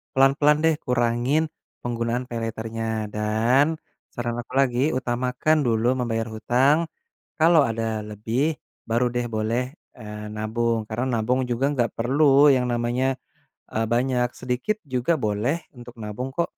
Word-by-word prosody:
pelan-pelan 140 +3 +4
deh 160 -1 +4
kurangin 125 +6 +1 0.3
penggunaan 120 +1 -1
Paylaternya 115 -1 -3
dan 115 +9 +2 0.4
saran 120 -1 -3
aku 120 +2 -9
lagi 130 -1 +3
utamakan 125 +4 +1
dulu 115 +2 +2
membayar 115 -2 -1
hutang, 125 +7 +3 0.6
kalau 165 -1 +6
ada 110 -1 -2
lebih 115 +9 -1 0.3
baru 120 +2 +2
deh 120 0 -1
boleh, 110 +3 0 0.4
eee, 105 -1 -7
nabung 110 +1 -1
karena 120 +4 -2
nabung 125 +4 +1
juga 120 +3 0
nggak 120 -4 0
perlu 140 +4 +5
yang 125 -1 +2
namanya, 120 +3 0 0.6
eee, 110 0 0
banyak 125 +1 +1
sedikit 125 +12 -1
juga 130 +4 0
boleh 115 +10 -1
untuk 120 0 -11
nabung 110 +5 -4
kok. 170 +4 0
120 Hz, 130 wpm, -24 LUFS, 115-130 Hz, 0.6 s, kalau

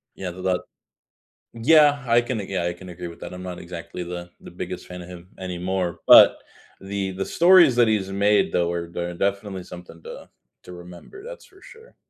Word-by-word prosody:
Yeah, 90 -2 -5
th 90 +1 -10
that 95 -1 0 0.9
Yeah, 145 +3 +4
I 120 +1 +4
can 120 -2 -4
a 100 - -5
yeah, 95 -3 -3
I 85 - -1
can 90 +1 -13
agree 90 0 -7
with 85 - -13
that. - - -8
I'm 90 - -9
not 90 -1 -7
exactly 85 0 -8
the 85 0 -7
the - - -12
biggest - - -7
fan 90 0 -9
of 85 - -12
him 90 0 -12
anymore, 90 -1 -3
but - - +8 0.4
the 95 0 -4
the 95 +1 -4
stories 175 -6 +5
that 120 -2 +4
he's 100 -3 0
made 100 +1 +2
though 85 -1 +1
are 85 -1 -4
de 85 +1 -5
definitely 100 0 -3
something 85 -2 -12
to - - -11 0.4
to - - -11
remember, 90 - -12
that's - - -10
for 385 -1 -22
sure. 450 +2 -16
95 Hz, 205 wpm, -23 LUFS, 90-110 Hz, 0.9 s, but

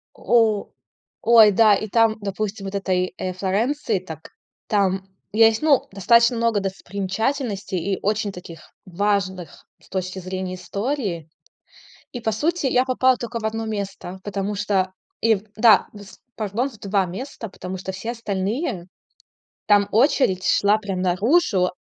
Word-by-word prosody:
О. 225 -4 +2 0.5
Ой, 225 -2 +7
да, 215 +1 +5
и 215 +2 -3
там, 225 +1 +3
допустим, 200 0 -4
вот 195 - -6
этой, 185 -2 -1
э, 185 - -3
Флоренции, 210 +6 -1
так 160 -3 -10 0.4
там 195 -2 +1 0.3
есть, 225 +2 +4
ну, 300 -4 +3
достаточно 235 +5 +4
много 230 -2 +1
достопримечательностей 200 +2 -3 0.2
и - - -5
очень 210 0 0
таких, 170 -3 -10 0.2
важных 190 -3 -2
с - - -22
точки 185 0 -4
зрения 185 0 -4
истории. 200 - -3 0.8
И 245 - -5
по 225 -1 -1
сути, 310 +7 0
я 255 -1 +3
попала 260 0 +3
только 235 -1 -5
в - - -10
1 225 +1 -2
место, 195 -3 -5
потому 200 0 -3
что 195 -2 0 0.3
ив 220 -3 +2
да, 220 -2 +6
вс 200 -2 -13 0.2
пардон, 220 +5 -2
в 225 - -16
2 200 -1 0
места. 225 +5 -7
Потому 185 -1 -7
что 190 +1 -5
все 195 +5 -5
остальные 210 - -3 0.8
там 205 -1 +4
очередь 220 - +2
шла 205 +1 +3
прям 195 -4 -4
наружу, 190 - +2
205 Hz, 145 wpm, -22 LUFS, 190-225 Hz, 0.8 s, Ой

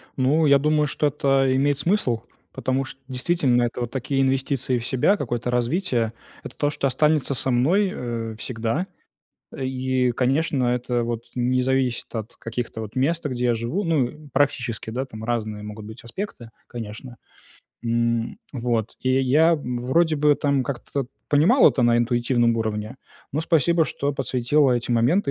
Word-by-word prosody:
Ну, 145 +5 +2
я 140 -1 +6
думаю, 150 +1 +2
что 150 +1 0
это 135 -2 +2
имеет 140 +1 +2
смысл. 140 - 0 0.3
Потому 130 +1 -1
что 135 - -11
действительно 130 -1 +1
это 120 +1 -2
вот 120 -1 -3
такие 135 +1 -1
инвестиции 130 -1 0
в 115 - -7
себя, 130 +10 +3
какое-то 120 - -3
развитие. 125 - 0 0.3
Это - - -9
то, 145 - +1
что 140 - -1
останется 150 +1 +2
со 130 - -1
мной, 175 +11 +3
э, 115 -2 -4
всегда, 120 +9 -2 0.7
и, 130 -1 0
конечно, 135 +3 +1
это 125 -1 -1
вот 115 -1 -3
не 125 +1 +1
зависит 130 -2 0
от 110 -1 -5
каких-то 115 0 -5
вот 110 -1 -8
мест, 155 +6 +1
где 125 -3 -1
я 120 - +3
живу. 120 - -2
Ну, 155 -8 +2
э, 135 - -11 0.2
практически, 120 -6 0
да, 125 +4 -3
там 110 -4 -10
разные 110 -3 -2
могут 105 0 -8
быть 110 +2 -10
аспекты, 120 - -6 0.2
конечно. 120 +2 -8 0.7
М. 115 - 0
Вот. 120 -4 -2
И 130 +1 +2
я 155 +6 +4
вроде 140 +4 0
бы 150 0 +4
там 140 -2 0
как-то 140 0 -4 0.2
понимал 165 - +6
это 125 - 0
на 120 0 +4
интуитивном 120 0 +2
уровне, 110 +1 -3 0.4
но 150 - 0
спасибо, 165 +1 +3
что 145 -1 -2
подсветила 135 +1 +2
эти 120 0 -1
моменты 125 - +2
130 Hz, 160 wpm, -23 LUFS, 120-145 Hz, 0.7 s, я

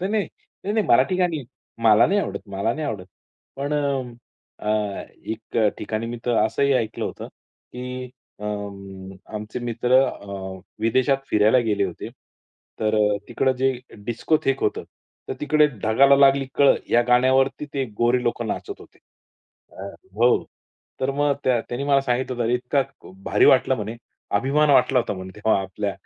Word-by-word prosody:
नाही-नाही, 205 +2 -1 0.4
नाही-नाही 210 +1 0
मराठी 130 +10 +4
गाणी. 170 -6 0 0.4
मला 110 0 +6
नाही 200 +2 +2
आवडत, - - -4
मला 100 +3 -1
नाही 155 0 -3
आवडत. 95 -9 -5 0.5
पण 140 +2 -3
अ, 140 -3 0 0.7
अ, 105 -2 -1 0.2
एक 110 +1 -6 0.2
ठिकाणी 110 +2 -3
मी 120 +1 -5
तर 120 -2 +2
असंही 140 +5 +1
ऐकलं 115 -4 -1
होतं, - - -6
की 125 0 -9 0.3
अं, 100 -2 -6 0.2
आमचे 105 +2 -5
मित्र 120 +1 -1
अ, 95 -5 -6 0.2
विदेशात 130 +4 +2
फिरायला 105 +4 +4
गेले 100 -2 +1
होते 90 -3 -6 0.7
तर 110 -1 +1
अ, 105 -1 +3
तिकडे 130 -1 +1
जे 135 +1 +2 0.3
डिस्कोथेक 135 +4 0
होतं, - - -1 0.4
तर - - -2
तिकडे 150 +1 +4 0.2
ढगाला 135 +6 +5
लागली 140 0 +5
कळ 140 -1 +5 0.2
या 120 - +5
गाण्यावरती 130 +3 +3
ते 135 -1 0
गोरे 120 +1 +2
लोक 120 0 -1
नाचत 110 - -5
होते. - - -17 0.7
अ 95 - -9 0.3
हो. 120 +3 +3 0.6
तर 130 +1 +1
मग 145 0 +2
त्या 125 -3 +3
त्यांनी 125 +3 -3
मला 140 -1 +4
सांगितलं 125 -1 -1
होत 115 - 0
इतका 125 +3 +1 0.4
भारी - - +3
वाटला - - +5
म्हणे, 110 +2 -5 0.4
अभिमान 145 +5 +2
वाटला 130 -1 +4
होता 120 - -1
म्हणे 95 0 -8
तेव्हा 105 -1 +2
आपल्या 100 +1 -3
125 Hz, 150 wpm, -23 LUFS, 105-135 Hz, 0.7 s, मला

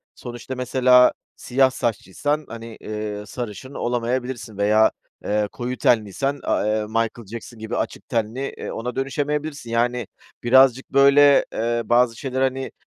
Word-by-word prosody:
sonuçta 120 +2 -7
mesela 125 0 +5 0.2
siyah 130 +1 +2
saçlıysan, 130 +7 -2
hani, 115 -1 -9
eee, 105 -1 -5
sarışın 120 +3 -7
olamayabilirsin 120 -2 -3
veya, 105 +2 +4 0.3
eee, 105 0 0
koyu 125 0 -4
tenliysen, 125 +6 +1
a - - 0
eee, 105 0 0
Michael 115 0 -2
Jackson 115 0 -8
gibi 110 +2 -4
açık - - -4
tenli, 120 +3 -2
eee, - - -6
ona 125 +2 -5
dönüşemeyebilirsin, 145 0 -3
yani, 120 -1 0 0.4
birazcık, 130 +1 +5
böyle, 140 +1 +6
eee, 120 +1 0
bazı 120 -1 +3
şeyleri, 130 +1 -2
hani, 130 0 -1
120 Hz, 135 wpm, -22 LUFS, 110-130 Hz, 0.4 s, böyle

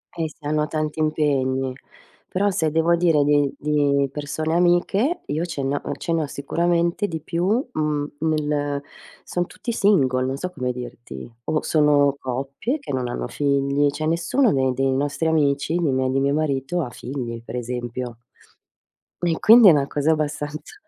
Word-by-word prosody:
Eh 165 -2 -2
si 150 -1 -17
hanno 150 0 0
tanti 155 -1 -3
impegni. 135 -4 0 0.5
Però, 200 +2 +1
se 160 -3 0
devo 165 +2 +3
dire 165 -4 +3
di 145 -1 +3
di 145 -2 +1
persone 155 +2 -3
amiche, 195 - +2
io 155 +3 -2
ce 155 -5 -4
ne 140 +1 0
ho - - -4
ce 165 - -3
ne 165 - +1
ho - - -4
sicuramente 170 +7 0
di 165 -4 -4
più, 170 +3 -2 0.2
mhmm 150 -5 -1
nel 150 -2 -1 0.4
sono 175 0 -2
tutti 240 - -5
single, 140 - +2
non 135 +1 -2
so 180 +4 -4
come 125 -6 -2
dirti. 120 - -8
O 155 - 0
sono 145 -2 +3
coppie 135 - -3
che 280 - -7
non 130 -2 -1
hanno - - -3
figli, 140 0 +1
cioè 155 +2 -4
nessuno 170 - +2
dei 130 -1 +2
dei 135 +1 +1
nostri 145 +3 -1
amici, 150 +1 +1
nè 165 -4 +1
miei 130 0 +1
nè 135 - +1
mio 140 +1 +1
marito 150 +2 -1
ha 135 - -3
figli, 120 -3 -6
per 120 - -8
esempio. 120 0 -4 1.0
E 170 -2 0
quindi 225 -1 +8
è - - +9
una 140 -2 +2
cosa 150 +2 +1
abbastanza, 150 0 -3
150 Hz, 170 wpm, -22 LUFS, 135-165 Hz, 1.0 s, è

